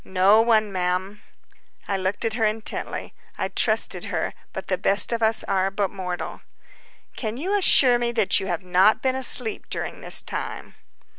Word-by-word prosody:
"No 190 +4 +3
one, 220 -2 +2
ma'am." 185 +2 -3 0.7
I 200 - -1
looked 190 +3 -2
at 225 - -1
her 225 0 -2
intently. 215 0 -3 0.2
I - - -2
trusted - - 0
her, - - -3 0.2
but - - -7
the - - -2
best 200 +4 +3
of 230 -1 -2
us 220 0 +2
are 190 0 0
but 195 0 -2
mortal. 180 -2 -6 0.7
"Can 220 -1 -5
you 375 +9 -2
assure 260 -11 +5
me 240 0 -1
that 220 -4 +2
you 195 - -5
have 175 -1 -3
not 185 +4 +3
been 260 -1 +1
asleep 250 -3 +1
during - - -5
this - - +3
time?" - - -6
210 Hz, 170 wpm, -23 LUFS, 190-230 Hz, 0.7 s, assure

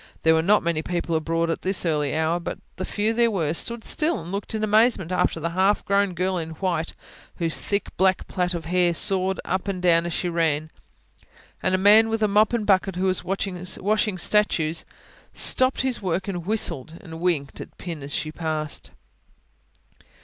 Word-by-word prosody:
There 160 - +5
were 160 - +3
not 205 +5 +3
many 170 -2 0
people 170 0 -2
abroad 165 +1 0
at - - -3
this 190 -1 +1
early 150 -3 0
hour, 160 +2 +1
but 170 - -5 0.2
the 185 - -3
few 215 +2 0
there 235 0 +3
were, 165 -8 -1
stood 235 +6 -3
still 315 +2 0
and 170 +1 -8
looked 200 +2 -4
in 215 - -2
amazement 215 -4 +3
after 180 -2 +1
the 165 +1 -3
half 190 +4 +2
grown 200 -2 +1
girl 185 +1 0
in 160 -1 -6
white, 170 -2 -2 0.4
whose 165 -2 -2
thick 200 0 -2
black 190 0 +2
plait 180 -1 -1
of 165 -2 -5
hair 175 0 +2
sawed 190 0 +1
up 185 +1 -2
and 195 -2 -2
down 170 -1 +3
as 170 - -4
she 180 - -1
ran; 160 -2 0 0.9
and 185 - +1
a - - +2
man 210 +4 +6
with 225 -1 +1
mop 210 +1 +3
and 235 -3 -1
bucket, 195 -2 +2
who 185 +1 -1
was 185 -1 0
washing 195 +2 -1
statues, 175 -5 +1 0.5
stopped 260 0 +4
his 260 -2 -2
work 185 0 -2
and 180 -3 -4
whistled, 165 -8 -1
and 165 -3 -10
winked 165 -6 -1
at - - -11
Pin 170 -4 -6
as 140 +1 -7
she 155 - -3
passed. 155 -2 -4
180 Hz, 190 wpm, -24 LUFS, 165-200 Hz, 0.9 s, man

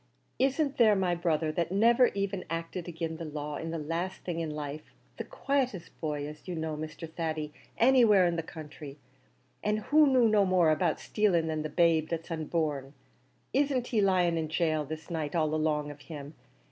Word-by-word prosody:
Isn't 275 +2 +1
there 220 -3 +6
my 185 -2 +1
brother, 165 -2 0
that 170 +2 -2
niver 235 +5 +5
even 195 -1 -2
acted 165 +2 -4
agin 165 -1 -4
the 165 - -6
laws 150 -1 -5
in 165 - -4
the 165 - -3
laste 165 +4 -3
thing 170 -2 -3
in 165 -1 -2
life, 150 0 -6 0.2
the - - -3
quietest 255 -11 -2
boy, 150 -2 -2
as 150 +3 -11
you 180 - -3
know, 160 -1 -3
Mr. 155 +1 -6
Thady, 155 -2 -4 0.2
anywhere 230 -6 +6
in 170 -1 +1
the 165 - -1
counthry, 150 -3 -10 0.7
an' 210 0 +1
who 295 +7 +4
knew 255 -3 +5
no 210 -2 +4
more 185 -4 +4
about 155 +1 +1
stilling 195 -6 +1
than 155 -1 -2
the 155 - -4
babe 160 0 +3
that's 165 0 -4
unborn; 155 -4 -2 0.6
isn't 270 -3 +1
he 225 -4 +2
lying 180 -4 +3
in 160 - -2
gaol 155 -1 0
this 155 +4 -7
night 160 -1 -3
all 155 -2 +1
along 150 -1 0
of 145 - -12
him? 145 -2 -9
165 Hz, 185 wpm, -29 LUFS, 155-195 Hz, 0.7 s, there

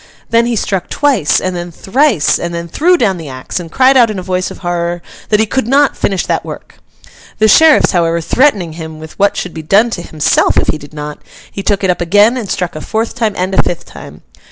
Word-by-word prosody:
Then 230 +1 +3
he 240 - -1
struck 195 -3 -2
twice, 270 - +1
and 185 -1 -3
then 175 0 -5
thrice, 215 - +1
and 170 0 -4
then 170 0 -5
threw 350 - +2
down 200 - +1
the 160 -4 -8
axe, 130 +6 -5
and 165 -2 -9
cried 265 +1 +4
out 240 -3 +5
in 215 - -4
a 185 - -5
voice 185 0 -2
of - - -10
horror 175 0 -2 0.3
that 210 - +3
he 220 - +3
could 245 +2 -2
not 280 +3 +3
finish 195 -2 -1
that - - -1
work. - - -10 0.6
The 215 - +3
sheriffs, 315 +7 +5
however, 170 -2 +1
threatening 190 - +1
him 160 -1 -8
with 160 0 -12
what 200 0 +2
should 180 - -4
be 160 - -6
done 205 +9 +2
to 175 - -4
himself 155 -3 +1
if - - +1
he 155 - -1
did 145 +1 -13
not, 150 0 -6 0.3
he 195 - -5
took 200 0 -1
it 190 - +3
up 175 - -4
again 205 +7 +3
and 230 -6 -5
struck 175 -3 -3
a 155 - -6
fourth 220 +5 -2
time 220 -4 -1
and 185 +1 -2
a - - +4
fifth 175 - -4
time. - - -12
190 Hz, 240 wpm, -13 LUFS, 170-230 Hz, 0.6 s, out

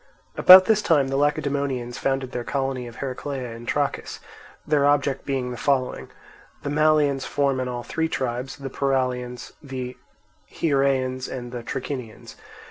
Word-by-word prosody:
About 185 +1 +10
this 215 0 +3
time 155 -9 +2
the 135 - -2
Lacedaemonians 140 -3 -1
founded 135 -1 -1
their 125 -2 -3
colony 135 -1 -2
of 120 - -11
Heraclea 130 -1 -5
in 115 +1 -10
Trachis, 145 +1 -2 0.5
their 150 -2 +2
object 140 -1 +1
being 130 -3 -1
the 120 - -6
following: 135 0 -1 0.5
the 145 - -3
Malians 150 -3 +2
form 140 -2 0
in 130 - -2
all 120 -1 -4
three 160 +5 -2
tribes, 125 -2 -3
the 135 0 -7
Paralians, 125 -3 -2
the 130 -3 -6 0.6
Hiereans, 135 -3 0
and 120 -2 -6
the 120 -1 -5
Trachinians. 125 -1 -6
135 Hz, 145 wpm, -24 LUFS, 125-140 Hz, 0.6 s, About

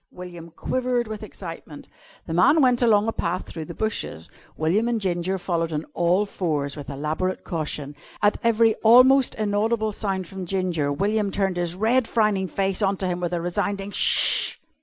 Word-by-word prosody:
William 175 -2 -10
quivered 245 +7 -1
with 215 -1 -6
excitement. 165 -7 -9 0.4
The 165 - -5
man 185 - +5
went 250 -3 +3
along 215 -3 +4
a - - +1
path 180 -3 -3
through 160 -2 -7
the 170 - -9
bushes. 100 - -4 0.3
William 180 +9 +1
and 235 -1 0
Ginger 185 -1 -1
followed 170 -2 -2
on 155 0 -3
all 175 +4 +2
fours 150 -8 -2
with 145 -3 -8
elaborate 155 +6 -3
caution. 150 -3 -4 0.2
At 205 0 +2
every 230 -1 +4
almost 255 +3 +6
inaudible 215 +1 0
sound 195 -3 -3
from 190 -1 -7
Ginger, 175 -6 -1
William 205 +6 0
turned 195 -2 -1
his 175 -1 -1
red, 225 +5 +2
frowning 210 -4 +1
face 195 +1 -1
on 195 -1 +1
to 190 - -3
him 175 -1 -2
with 175 -1 -2
a 175 -1 -1
resounding 195 +3 -2
"Sh!" - - +3
190 Hz, 175 wpm, -24 LUFS, 170-215 Hz, 0.4 s, almost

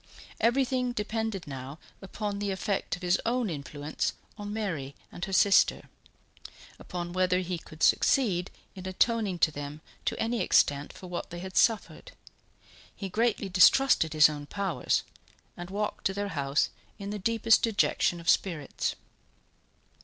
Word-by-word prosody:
Everything 250 +1 +1
depended 220 -3 -3
now 135 +1 -7 0.2
upon 200 +1 -4
the 205 0 -2
effect 195 +1 -2
of 180 - -13
his 175 0 +2
own 235 -3 0
influence 145 0 -3 0.2
upon 205 -1 -7
Mary 165 -11 -3 0.2
and 175 - -5
her 195 - -7
sister 190 +1 +4 0.9
upon 175 -1 -6
whether 185 0 +2
he 180 -1 -3
could 155 -1 -9
succeed 195 -9 +3 0.2
in 185 -1 -8
atoning 205 0 +1
to 160 - +3
them 145 0 -7 0.3
to - - -1
any 230 +1 0
extent 145 0 +2
for - - -12
what 175 -1 -5
they 175 - -7
had 185 +1 -7
suffered. 235 - +1 0.8
He 195 - -5
greatly 220 0 0
distrusted 185 - +5
his 155 -1 +7
own 145 -1 -6
powers, 195 -3 -1 0.5
and 175 +1 -8
walked 210 +2 -3
to 190 - -4
their 205 0 -2
house 140 -4 0 0.3
in 200 -1 -6
the 210 - -4
deepest 225 +2 +3
dejection 200 -5 +1
of 170 - -11
spirits. 165 -7 0
190 Hz, 145 wpm, -28 LUFS, 170-215 Hz, 0.9 s, his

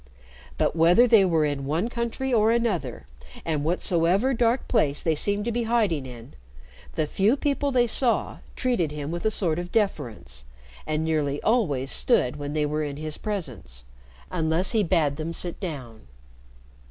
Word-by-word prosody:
But - - +1
whether 170 +9 +5
they 225 -4 +6
were 165 -4 +2
in 145 -2 -2
one 160 +9 0
country 240 +2 -3
or 220 -1 +4
another, 205 - -1 0.4
and 155 -3 -1
whatsoever 180 - +2
dark 235 +1 +1
place 150 - +1
they 160 - +2
seemed 205 +6 -1
to 235 - -1
be 235 0 -1
hiding 205 - +1
in, 120 0 -11 0.6
the 155 - +1
few 200 - +1
people 285 0 0
they 245 -2 +3
saw 240 +1 0 0.2
treated 235 -12 0
him 150 0 -5
with 170 +3 -5
a - - +4
sort 175 -6 -1
of 175 0 -6
deference, 120 - -2 0.4
and 155 +1 -1
nearly 150 -3 0
always 150 - +1
stood 150 - +2
when 145 0 -5
they 150 -1 +1
were 150 +1 -1
in 145 -1 -5
his 155 0 -4
presence, 130 - -5 0.5
unless 165 +1 0
he 225 -3 +2
bade 155 -6 +1
them 160 +1 -4
sit 175 0 -4
down. 130 - -7
170 Hz, 165 wpm, -25 LUFS, 150-225 Hz, 0.6 s, they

